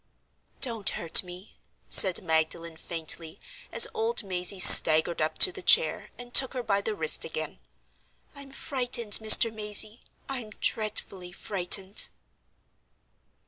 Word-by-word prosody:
"Don't 230 -6 -1
hurt 165 - +2
me!" 180 +2 -17 0.3
said 190 -1 +5
Magdalen, 160 0 -5
faintly, 160 0 -5 0.3
as - - +4
old 460 +1 -3
Mazey 185 0 -4
staggered 160 -1 +6
up 155 - -5
to 375 - +4
the 390 - -12
chair, - - 0
and 245 0 -15
took 265 0 +2
her 250 - -7
by 200 -3 -4
the 215 +1 -7
wrist 160 -4 0
again. 155 0 -9 0.7
"I'm 280 -1 -15
frightened, 245 -6 -1
Mr. 220 +1 +3
Mazey—I'm 215 +3 -5
dreadfully 195 -4 -8
frightened." 190 +1 -1
200 Hz, 120 wpm, -23 LUFS, 175-240 Hz, 0.7 s, staggered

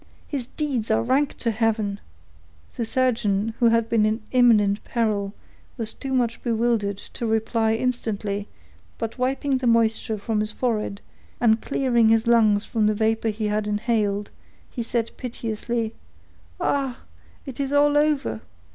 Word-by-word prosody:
His 265 -5 -4
deeds 265 -8 -2
are 220 - +2
rank 270 +4 +1
to 230 - 0
heaven!" 215 -2 0 0.8
The 235 - -2
surgeon, 225 -4 +1
who 235 - +5
had 230 0 +2
been 230 -2 +2
in 215 +1 0
imminent 220 -5 +4
peril, 210 -4 -1 0.5
was 225 -3 -3
too 270 - -6
much 245 -3 0
bewildered 225 -4 0 0.2
to 235 - -3
reply 220 0 +1
instantly, 215 -4 -2 0.5
but 225 +2 -5
wiping 265 +1 0
the 255 - -1
moisture 225 -1 +2
from 210 +1 -1
his 215 0 -1
forehead, 215 -5 -2 0.4
and 225 -2 +3
clearing 240 -5 +2
his 225 +1 +3
lungs 220 -3 +4
from 220 -2 +1
the 215 - +2
vapor 225 +1 +1
he 215 0 -3
had 210 0 0
inhaled, 210 -1 0 0.4
he 240 - -4
said 230 0 -1
piteously,— 230 -2 -3 0.7
"Ah! 270 -3 -1 0.4
it 270 -2 -8
is 275 -1 -1
all 290 0 +4
over! 295 - +1
225 Hz, 145 wpm, -24 LUFS, 215-245 Hz, 0.8 s, who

